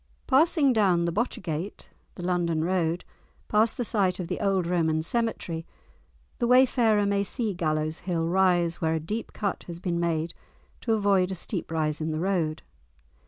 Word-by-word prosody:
Passing 285 0 +4
down 185 -6 +3
the 170 - 0
Botchergate 185 -5 -3 0.3
(the 175 - -7
London 170 -3 0
Road), 175 -1 0 0.4
past 220 +2 +2
the 245 - -1
site 195 -5 +1
of 180 - -3
the - - -2
old 195 -3 +1
Roman 160 -2 +1
cemetery, 185 -6 -1 0.8
the 240 - +1
wayfarer 240 -4 +4
may 200 0 +1
see 215 +1 -2
Gallows 155 -2 -1
Hill 170 -3 -1
rise 175 -2 +2
where 160 -1 +1
a - - 0
deep 210 +9 -4
cut 200 -3 -3
has 170 -1 -6
been 175 -1 -2
made 165 -1 -1 0.5
to 225 - 0
avoid 200 -3 +2
a 190 - -3
steep 180 +1 -4
rise 155 -1 -1
in 155 - -1
the 155 - -2
road. 170 -4 -1
180 Hz, 165 wpm, -27 LUFS, 165-210 Hz, 0.8 s, Passing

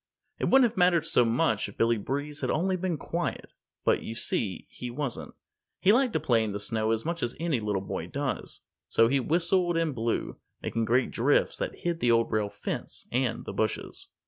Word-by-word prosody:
It - - 0
wouldn't 265 -2 +6
have 200 - -6
mattered 175 -3 +4
so 125 - +5
much 115 -2 +1
if 100 - -14
Billy 115 -1 +2
Breeze 145 +6 -4
had - - -1
only 185 +4 +1
been 180 -2 -1
quiet. - - -3 0.3
But, - - +3
you 115 - -6
see, 105 -4 -2
he 125 - -7
wasn't. 130 0 -4 0.4
He 200 - +5
liked 250 0 +3
to - - +2
play 120 -7 +2
in 105 -2 -3
the 100 - -3
snow 110 +1 -1
as 115 +2 0
much 170 +1 -2
as 120 - -2
any 165 -6 0
little 105 -3 -1
boy - - -4
does. - - -4 0.3
So 115 - +5
he 135 +3 +2
whistled 175 +4 +2
and 165 -3 +1
blew, 115 -1 -2 0.2
making 115 -1 -1
great 125 +3 +2
drifts 135 +5 +2
that - - -4
hid 170 -1 -1
the 120 - +2
Old 115 0 +3
Rail 105 -1 +1
Fence - - -5
and 125 -2 0
the - - -5
bushes. 110 - -3
125 Hz, 205 wpm, -28 LUFS, 115-170 Hz, 0.4 s, wouldn't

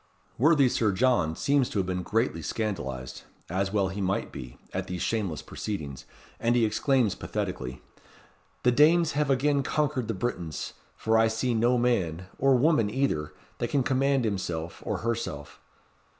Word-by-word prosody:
Worthy 145 0 +5
Sir 110 -3 +2
John 95 -7 +2
seems 140 - +2
to - - -4
have 95 - +1
been 90 0 -2
greatly 110 -2 0
scandalized, 75 - -4 0.3
as 95 +2 0
he 100 - -6
well 95 -2 +1
might 95 -1 -1
be, 60 -1 -9 0.2
at - - -3
these 90 -1 -3
shameless 100 -9 -1
proceedings, 75 -11 -5 0.3
and 120 +1 +2
he 120 -2 +4
exclaims 110 +1 +2
pathetically, 65 0 -4 0.8
"The 125 - +5
Danes 160 +5 +5
have 150 0 0
again 140 +2 +2
conquered 140 -3 0
the 115 - -2
Britons; 90 -6 -3 0.2
for 110 0 +2
I 115 - +5
see 110 +3 0
no 120 +2 +3
man, 95 -9 0
or 135 0 +5
woman 125 -5 +3
either, 110 - -1 0.2
that - - -1
can 140 -2 +2
command 135 0 +2
himself 85 -5 -3
or - - -2
herself." 115 -11 -3
110 Hz, 160 wpm, -27 LUFS, 90-130 Hz, 0.8 s, Worthy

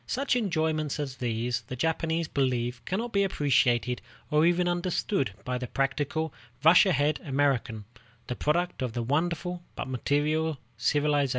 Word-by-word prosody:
Such 270 0 0
enjoyments 160 - 0
as 135 -3 -4
these, 120 0 -1
the 130 - -5
Japanese 160 +3 0
believe, 125 -4 -1
cannot 225 +6 -2
be 200 0 +3
appreciated 125 -8 +2 0.3
or 155 +2 +4
even 175 0 +2
understood 175 - 0
by 125 0 -2
the 125 - -4
practical, 145 +4 -1 0.3
rush 175 +5 +7
ahead 150 -3 +2
American, 135 -6 0 0.4
the 125 - -4
product 175 +4 0
of 125 -3 -2
the 120 - -2
wonderful 170 +6 -1
but - - -4
material 150 +4 0 0.2
civilization 120 +6 +1
of 145 - +1
the 150 - +2
West. - - -3
150 Hz, 160 wpm, -28 LUFS, 125-170 Hz, 0.4 s, rush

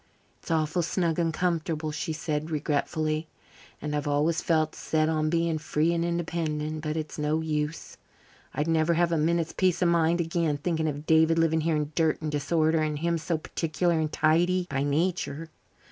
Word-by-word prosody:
"It's - - -12
awful 160 +1 +1
snug 170 -1 0
and 165 -1 +1
comfortable," 160 -2 -1
she 150 - -3
said 155 -1 -3
regretfully, 155 +1 -1 0.5
"and 150 0 -3
I've 145 0 -2
always 150 +4 +1
felt 155 -2 +1
set 155 0 0
on 155 -1 +1
being 165 -1 +1
free 155 +2 +1
and 170 0 0
independent. 160 -3 -2
But 155 0 -3
it's 155 0 -5
no 150 +2 0
use. 150 0 -3 0.5
I'd 150 - -2
never 165 +1 +2
have 170 0 +2
a 165 - +2
minute's 165 +1 +1
peace 185 -2 +1
of 175 - +4
mind 170 0 +2
again, 165 -3 0
thinking 160 +1 -1
of 145 0 -4
David 160 +1 +4
living 160 -1 +2
here 160 0 +1
in 150 0 -2
dirt 160 0 +1
and 155 -1 -3
disorder, 160 +2 +1
and 155 -1 -1
him 170 +2 0
so 165 +1 -1
particular 165 +2 -1
and 155 -1 -1
tidy 175 +4 +2
by 135 0 0
nature. 160 +1 -1
160 Hz, 180 wpm, -27 LUFS, 155-170 Hz, 0.5 s, of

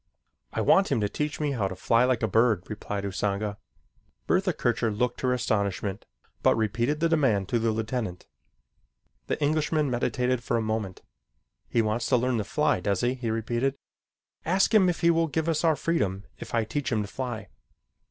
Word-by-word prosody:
"I - - -2
want 195 - +4
him - - +2
to 105 - +2
teach 150 +7 -3
me 150 -2 0
how 110 -8 0
to 95 - -6
fly 115 +6 +3
like 125 -2 +1
a - - +3
bird," 110 -2 +3
replied 105 -1 -4
Usanga. 100 +1 -2 0.7
Bertha 185 0 +2
Kircher 120 -6 0
looked 115 +4 -1
her 130 - +1
astonishment, 100 -5 -1 0.4
but - - +4
repeated 115 +7 0
the 165 - +3
demand 130 - +2
to 120 - +1
the 115 0 +1
lieutenant. 110 -4 -3 1.0
The - - -1
Englishman 150 -1 +1
meditated 125 0 0
for 115 - 0
a - - +1
moment. 110 -4 -3 0.7
"He 115 - +2
wants 110 +2 -1
to 125 - +4
learn 125 -1 0
to - - -1
fly, 95 - +1
does 100 +1 0
he?" 120 +1 +1
he 125 -3 -4
repeated. 120 +4 -1 0.7
"Ask 190 +6 +2
him 195 -4 +6
if 175 - -2
he 170 0 +5
will 165 0 +2
give 160 +2 -2
us 160 -1 0
our 160 -2 +4
freedom 100 - -1 0.2
if - - -5
I 115 - +2
teach 135 +6 -3
him 110 -3 +1
to - - -6
fly." 110 -4 -5
120 Hz, 190 wpm, -27 LUFS, 105-145 Hz, 1.0 s, him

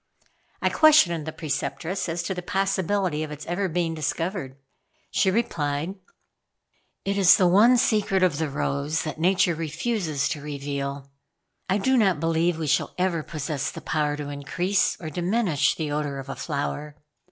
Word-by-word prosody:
I - - +4
questioned 175 - +5
the - - -2
Preceptress 155 +4 -3
as 170 +1 -2
to 190 - -2
the 180 - -5
possibility 195 -3 0
of 155 - -3
its 150 0 -8
ever 185 +3 -1
being 165 0 -1
discovered? 160 -2 -3 0.6
She 190 - +2
replied: 165 -6 -1 1.1
"It 200 0 0
is 190 -2 +7
the 185 - +3
one 215 +8 +6
secret 210 -6 +2
of 165 -5 +2
the 160 -2 -1
rose 140 +2 -1
that 155 0 -5
Nature 180 +1 +3
refuses 160 - -2
to 155 -4 -4
reveal. 140 -1 -5 0.6
I 190 - +3
do 260 +6 +2
not 190 -8 +3
believe 165 +1 +1
we 160 - -3
shall 145 - 0
ever 180 -3 0
possess 150 -2 -3
the - - -8
power 150 -2 -1
to 145 -1 -5
increase 175 +7 0
or 160 -3 -6
diminish 180 -1 +1
the 155 -3 -3
odor 145 -1 -2
of 135 0 -8
a - - -4
flower. 145 0 -4
165 Hz, 165 wpm, -25 LUFS, 145-190 Hz, 1.1 s, is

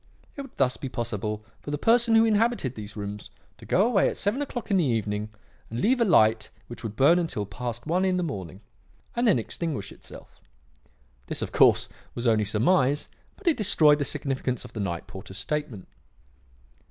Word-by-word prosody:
It 280 - -5
would 275 -2 -12
thus 130 -2 +2
be 135 - -5
possible 110 -3 -4
for - - -9
the 145 - -1
person 230 - +3
who 225 0 +6
inhabited 220 - +1
these 105 -3 -8
rooms 105 0 -6 0.3
to 115 - -13
go 195 - +3
away 225 -5 +3
at - - -6
seven 210 +8 -1
o'clock 245 -6 -5
in 195 - +4
the 180 - +3
evening 105 -5 -1 0.4
and 115 - -4
leave 245 - +2
a - - +5
light 110 - +4 0.2
which 120 - -10
would 110 -2 -6
burn 145 +8 +5
until 160 -12 -2
past 120 +3 -6
one 175 +4 +1
in 185 -1 +1
the 180 - 0
morning 95 - -6 0.5
and 240 0 +1
then 205 - +5
extinguish 130 - -4
itself. - - -13 0.9
This, - - -2
of - - -5
course, - - +4 0.3
was 120 - -4
only 110 -2 +3
surmise, 130 - +2 0.3
but 410 - -20
it 335 -3 +3
destroyed 155 -8 +4
the - - +1
significance 130 -4 -2
of 125 - -12
the 110 - -6
night 85 -4 -3
porter's 95 0 -10
statement. 130 - -4
130 Hz, 190 wpm, -26 LUFS, -, 0.9 s, who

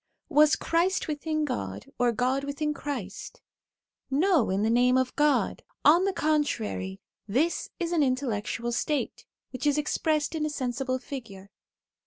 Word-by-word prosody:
Was 300 -1 +5
Christ 350 +3 +1
within 310 0 -1
God, 100 - -4
or 245 -1 +3
God 255 +4 0
within 300 +2 -2
Christ? 270 -9 -6 0.7
No, 310 - +3
in 195 +2 +1
the 220 - +2
name 250 +2 +4
of 260 -1 0
God! 295 0 +2 0.2
On 340 +5 +6
the 395 - +2
contrary, 260 - -1 0.3
this 280 +12 0
is 340 -1 -2
an 335 -3 +2
intellectual 240 -3 -1
state, 285 +5 -2 0.2
which 255 +3 -3
is 290 0 +3
expressed 305 0 0
in 315 -2 -2
a 305 - 0
sensible 255 -2 -2
figure. 225 -7 -9
275 Hz, 145 wpm, -27 LUFS, 240-305 Hz, 0.7 s, On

